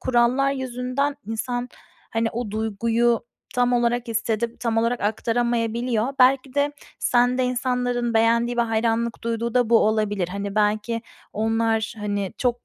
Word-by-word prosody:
kurallar 255 +2 +2
yüzünden 260 +2 -2
insan, 245 +3 -3 0.4
hani, 225 0 0
o 235 -2 -3
duyguyu 225 +2 +1 0.3
tam 245 0 +2
olarak 240 0 +1
hissedip 225 +1 -2
tam 230 -2 -1
olarak 230 +2 +1
aktaramayabiliyor. 235 +2 0
Belki 260 +1 +4
de 285 0 +1 0.3
sende 250 +1 +2
insanların 245 -1 -1
beğendiği 235 +2 +3
ve 240 - +3
hayranlık 225 +1 0
duyduğu 230 0 -2
da 245 -2 +2
bu 230 - +7
olabilir. 210 -4 +1
Hani, 200 +1 -4
belki 215 +2 0 0.3
onlar, 225 0 0
hani, 205 -2 -2
çok 245 -1 -1
235 Hz, 135 wpm, -23 LUFS, 225-245 Hz, 0.4 s, bu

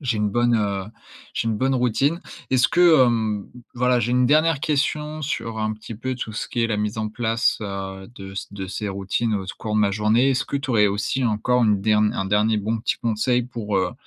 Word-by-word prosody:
j'ai 125 -7 -1
une 105 0 +1
bonne, 120 +2 +2
heu, 100 -2 -1 0.5
j'ai 115 - -1
une 110 - 0
bonne 130 +3 +1
routine. 130 +7 +1 0.3
Est-ce 130 -1 +4
que, 170 -6 +6
hem, 110 -4 -1 0.3
voilà, 125 0 +2
j'ai 120 +1 -1
une 125 0 +3
dernière 155 0 +3
question 150 +1 -1
sur 115 -6 -3
un 110 0 -1
petit 110 +1 -9
peu 130 +4 -4
tout 115 -3 -6
ce 105 - -4
qui 120 - -1
est - - +3
la 110 -2 -1
mise 105 +1 -2
en 110 0 -1
place, 115 +2 0
heu, 95 -1 -6
de 95 -2 -9
s 95 - -6
de 95 -2 -5
ces 105 +2 -4
routines 100 +3 -1
au 95 -2 -3
cours 105 +2 -5
de - - +3
ma 100 -1 +3
journée. 110 +6 +3
Est-ce 130 - 0
que 140 - -3
tu 140 - -7
aurais 105 -3 +4
aussi 105 +6 -1
encore 120 +3 +1
une 105 -2 +2
dern 105 0 +2
un 95 - -2
dernier 105 +2 +2
bon 110 +2 -1
petit 115 - -1
conseil 120 +2 0
pour, 115 -5 -3
heu, 95 -1 0
110 Hz, 230 wpm, -23 LUFS, 105-125 Hz, 0.5 s, que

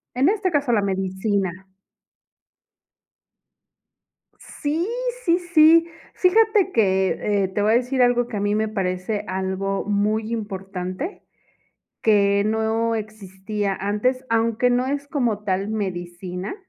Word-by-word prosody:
En 270 +6 +3
este 405 -2 0
caso, 290 -6 0
la 215 -3 +3
medicina. 190 0 -1 2.9
Sí, 320 +5 -3 0.4
sí, 345 0 +3
sí. 325 +2 +7 0.3
Fíjate 420 +1 +3
que, 195 - +1
eh, - - +1
te 200 +2 -2
voy 210 +1 +3
a - - +5
decir 250 +2 +1
algo 245 -1 +3
que 225 -4 -5
a - - -1
mí 205 +1 0
me 220 0 0
parece 190 0 -2
algo 190 +1 -2
muy 215 +2 0
importante, 195 - -5 0.8
que 200 -2 +3
no 220 +1 0
existía 205 -1 -4
antes, 230 +6 0
aunque 230 +2 +2
no 245 +1 +1
es 285 +1 -3
como 240 -8 0
tal 195 0 -1
medicina 180 - -4
215 Hz, 120 wpm, -22 LUFS, 195-250 Hz, 2.9 s, sí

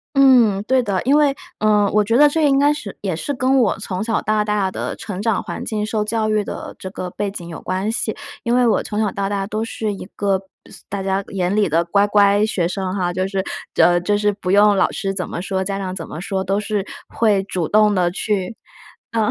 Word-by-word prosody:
嗯， 245 -8 +5
对 260 +3 +2
的。 200 -5 -1
因 275 +3 +4
为 285 -2 +3 0.2
呃， 210 -1 +3
我 210 - +4
觉 225 +3 +1
得 295 +3 +7
这 320 +2 0
应 275 -1 +3
该 290 +1 +4
是 295 -10 -7
也 190 -4 -1
是 170 - -3
跟 260 +1 +2
我 230 - +1
从 185 0 -4
小 225 0 0
到 215 0 +1
大 210 -2 0
的 - - -4
成 200 -4 -6
长 220 -1 0
环 - - -6
境， 210 -2 -2
受 215 0 -1
教 215 0 -1
育 215 -1 +2
的 - - -7
这 185 - -7
个 185 -1 -6
背 205 +2 -3
景 175 -4 -8
有 165 - -7
关 190 +3 -2
系。 225 -2 -2 0.3
因 235 - 0
为 250 -1 +4
我 225 - +2
从 210 0 -3
小 210 -2 +1
到 200 0 -2
大 200 -1 -2
都 215 +2 -2
是 220 -1 -3
一 195 - -8
个 195 -2 +1 0.5
大 200 -1 -4
家 190 0 0
眼 185 -1 -1
里 210 -2 +2
的 165 +2 +2
乖 200 +4 +2
乖 205 0 +4
学 180 -5 -1
生 185 0 -3
哈， 180 -3 -1
就 185 +1 -1
是 195 -1 -2 0.3
呃， 175 0 +5
就 205 +4 +1
是 205 0 +1
不 195 -2 -5
用 205 +1 +5
老 - - +2
师 195 -1 -2
怎 180 -2 -3
么 - - -5
说， 190 0 -2
家 195 +1 -3
长 185 -2 -4
怎 165 -4 -7
么 155 - -7
说， 190 +1 -2
都 195 +2 0
是 210 -2 -2 0.2
会 210 -4 +2
主 180 -5 -3
动 210 0 +4
地 180 -2 +2
去 195 +2 -2 0.6
嗯， 220 -2 +1
205 Hz, 260 characters per minute, -20 LUFS, 190-215 Hz, 0.6 s, 得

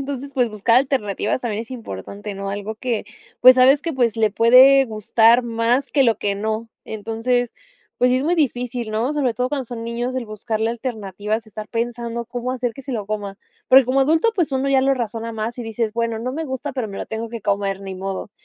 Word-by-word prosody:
entonces, 275 0 -5
pues, 245 -3 +1
buscar 215 +2 +2
alternativas 255 -4 0
también 225 -3 -3
es 235 - -16
importante, 205 - -7
¿no? 195 0 -4
Algo 205 +2 -4
que, 235 0 -2 0.4
pues, 255 +1 +9
sabes 265 +3 +5
que, 330 - -3
pues, 235 -4 +1
le 215 -2 +2
puede 260 +5 +7
gustar 225 +2 +3
más 235 +4 0
que 280 - +4
lo 230 -5 +2
que 200 -1 -1
no. 220 +2 -3 0.2
Entonces, 225 +3 -2 0.4
pues, 250 0 +4
sí 255 - +3
es 270 - -2
muy 345 +3 +2
difícil, 245 -6 -1
¿no? 230 +7 0
Sobre 270 -5 0
todo 250 0 -1
cuando 280 -3 -2
son 230 -1 -7
niños, 240 +2 -3
el 245 - -3
buscarle 220 +1 -2
alternativas, 220 -2 -4
estar 215 0 -8
pensando 235 0 -3
cómo 245 +1 -4
hacer 245 -2 -2
que 275 - -11
se 270 - -7
lo 210 -4 -3
coma. 205 -2 -4 0.3
Porque 265 0 +8
como 260 +2 +1
adulto, 320 +11 +3
pues, 345 -6 0
uno 265 +1 0
ya 270 -1 +4
lo 270 +1 +3
razona 230 -1 -4
más 225 +2 -4
y - - -3
dices: 225 -1 -2
"Bueno, 230 -1 -1
no 250 +3 -3
me 320 +3 -3
gusta, 270 +1 -4
pero 250 -5 -3
me 195 - -8
lo - - -5
tengo 225 +1 -5
que 230 0 -7
comer, 200 -1 -1
ni 195 -1 -6
modo". 195 +2 -5
235 Hz, 220 wpm, -21 LUFS, 215-255 Hz, 0.4 s, pues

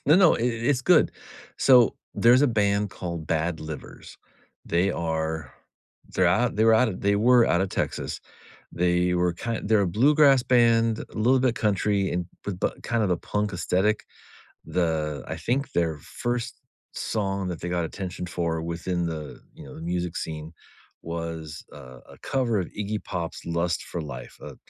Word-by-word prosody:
No, 155 +4 +6
no, 185 -4 +6
i - - -5
it's 120 +2 0
good. - - +4 0.5
So, 125 -3 +6 0.2
there's 125 +3 +5
a - - +5
band 100 -2 +1
called 85 -4 -6
Bad 80 +1 -1
Livers, 80 -2 -9 0.5
they 85 +4 +2
are 80 -4 -3 0.6
they're - - +3
out - - +2
they 110 - +3
were 115 - +6
out 120 +2 +4
of 90 - -5
they 100 0 +2
were 120 +2 +5
out 85 - +2
of 95 - -1
Texas, - - -3 0.5
they 90 0 +1
were 90 0 +1
kind 115 +4 -4
they're 110 -1 +4
a 100 - +1
bluegrass 135 - +5
band, 115 -2 +3
little 125 +4 +3
bit 125 -2 +1
country 100 -2 +1
and 90 0 -1 0.2
with 95 -3 -4
bu - - +1
kind 115 -2 0
of 100 - 0
a 90 - +2
punk 105 -1 -2
aesthetic. 95 +4 0 0.6
The 80 -4 -1
I 80 - -4
think 125 - -2
their 80 -3 0
1st 120 - -4 0.3
song 95 -3 -2
that 85 -3 -5
they 85 - -3
got 90 -1 0
attention 90 +1 -5
for 85 -2 -2
within 85 +1 -2
the, 80 -3 -6
you - - -12
know, 65 - -11
the - - -9
music 90 0 -2
scene 80 +1 -6 0.5
was 80 -2 -5
a 65 -3 -12 0.2
a - - -22
cover 120 -5 0
of 90 - -3
Iggy 105 +1 -4
Pop's 85 -2 -5
“Lust 85 0 -1
for 85 - -5
Life,” 70 -5 -8
a - - -9
90 Hz, 175 wpm, -25 LUFS, 85-115 Hz, 0.6 s, No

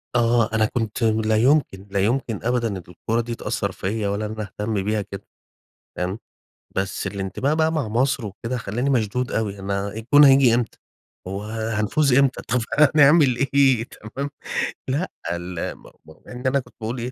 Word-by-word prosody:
آه 115 -2 +3
أنا 110 0 +3
كنت 115 +1 -2
لا 110 -1 +2
يمكن، 120 -6 +2
لا 100 - 0
يمكن 115 +2 0
أبدًا 115 -4 0
الكورة 115 +5 -1
دي 115 0 -5
تأثر - - -2
فيَّ 105 +2 -2
ولا 100 +2 -1
إن 105 - -4
أنا 110 0 -5
أهتم 105 +1 -3
بيها 105 +1 0
كده، 100 -1 -8 0.7
فاهم، 95 +4 -2 0.6
بس 95 +1 -2
الانتباه 100 +9 -2
بقى 160 0 +2
مع 155 -8 -1
مصر 125 +2 0
وكده 115 +5 -4
خلّاني 120 +4 -2
مشدود 125 0 0
أوي، 100 -3 -2
أنا 100 +1 -2
الجون 115 +8 +4
هييجي 135 -3 +6
إمتى؟ 120 -2 -2 0.5
هو 100 +2 -4
هنفوز 110 +5 0
إمتى؟ 135 0 +3
طب 125 +2 0 0.4
هنعمل 145 -3 +6 0.2
إيه 135 -5 +4
تمام، 130 +5 -7 0.6
لأ 145 +8 -1 0.2
ال 85 0 -4
م - - -21 0.2
م 80 - -14
مع - - -10
إن 125 +1 -4
أنا 140 +2 +3
كنت 130 - -12
باقول 115 +3 -3
إيه، 125 +2 -4
115 Hz, 170 wpm, -23 LUFS, 105-130 Hz, 0.7 s, هييجي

